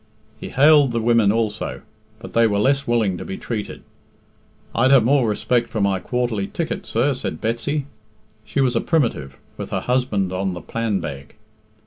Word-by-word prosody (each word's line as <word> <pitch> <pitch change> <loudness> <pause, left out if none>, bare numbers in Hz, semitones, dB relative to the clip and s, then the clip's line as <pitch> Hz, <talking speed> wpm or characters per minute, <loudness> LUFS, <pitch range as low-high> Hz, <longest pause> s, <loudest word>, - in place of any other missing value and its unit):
He - - -7
hailed 145 -2 +5
the 115 - 0
women 115 -3 +3
also, 110 -1 -2 0.3
but - - -11
they 115 0 +4
were 100 -2 0
less 135 +6 +1
willing 110 -7 +1
to - - -5
be 95 - -6
treated. 110 -4 -5 0.9
"I'd 130 - +3
have 135 -4 +6
more 130 -1 +3
respect 120 +3 0
for 110 - -3
my 100 -2 +1
quarterly 120 -5 -2
ticket, 170 - -4
sir," 130 +5 +1
said 130 - -5
Betsy 120 +6 -2 0.6
she 140 - -1
was 130 -2 +1
a 115 - +2
Primitive, 115 - -1 0.2
with - - -6
her - - -2
husband 115 -7 0
on 95 0 -2
the 90 - -7
"Planbeg." 85 -12 -4
115 Hz, 170 wpm, -21 LUFS, 100-130 Hz, 0.9 s, have